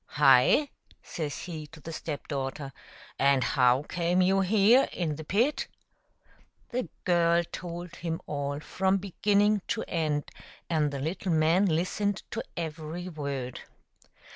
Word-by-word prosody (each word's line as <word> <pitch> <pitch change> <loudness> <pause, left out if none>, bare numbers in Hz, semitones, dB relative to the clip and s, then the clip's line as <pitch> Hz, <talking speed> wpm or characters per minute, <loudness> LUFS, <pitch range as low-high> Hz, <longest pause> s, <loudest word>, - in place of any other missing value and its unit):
" - - -50 0.2
Hi 135 - +6 0.2
!" - - -29
says 150 -3 -4
he 155 -4 -6
to 155 - -14
the 165 +2 -8
step 155 -2 -5
daughter, 135 0 -4 0.3
" - - -19
and 140 -2 +4
how 125 +1 +3
came 175 +2 0
you 190 +1 +3
here 215 +6 +4
in 160 -4 -2
the 160 - -7
pit?" 230 - +1 1.0
The 250 0 -3
girl 170 -1 +3
told 175 0 -7
him 165 -1 -3
all 145 -1 -3
from 190 +4 +1
beginning 205 +2 +2
to - - -1
end, 155 -3 -1 0.4
and 155 -2 +2
the 140 - -5
little 175 +6 -2
man 165 +5 +3
listened 185 +4 0
to - - -2 0.2
every 165 +2 -5
word. 140 -6 -4
165 Hz, 145 wpm, -28 LUFS, 145-185 Hz, 1.0 s, Hi